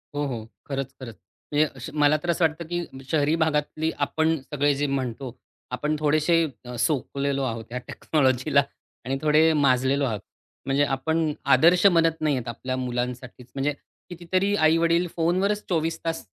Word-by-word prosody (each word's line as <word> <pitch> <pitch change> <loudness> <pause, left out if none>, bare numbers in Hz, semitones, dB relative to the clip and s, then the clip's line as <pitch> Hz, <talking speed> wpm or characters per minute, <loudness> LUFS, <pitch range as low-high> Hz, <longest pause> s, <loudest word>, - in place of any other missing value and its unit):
हो, 145 0 0
हो, 115 -5 -5 0.2
खरंच, 135 -1 -3
खरंच. 115 -4 -8 0.4
म्हणजे 150 +1 +3
अश 130 +3 -7
मला 145 +1 +5
तर 175 - -3
असं 170 0 +3
वाटतं, 160 +1 -2
की 170 -6 -5
शहरी 155 0 +2
भागातली 155 +1 -1
आपण 160 +1 +1 0.2
सगळे 145 0 +2
जे 145 +1 -1
म्हणतो 130 -2 -3 0.4
आपण 150 +4 -1
थोडेसे 155 +3 +3 0.2
अ, 125 0 -7
सोकलेलो 140 +1 0
आहोत 115 -3 -3
ह्या 125 - -4
टेक्नॉलॉजीला 140 -1 +1 0.4
आणि 135 +1 -1
थोडे 155 +1 +4
माजलेलो 140 -1 +2
आहोत. 110 -5 -2 0.5
म्हणजे 135 +1 +2
आपण 155 +4 0 0.2
आदर्श 175 +4 +5
बनत 165 -3 +3
नाही 150 -3 +2
आहेत 125 -2 -4
आपल्या 130 +2 -4
मुलांसाठीच. 125 0 -4
म्हणजे 140 +2 0 0.4
कितीतरी 185 +3 -1
आई-वडील 165 +1 +3
फोनवरच 185 +5 +1
24 165 -2 0
तास 165 -5 -3
145 Hz, 155 wpm, -25 LUFS, 130-165 Hz, 0.5 s, मला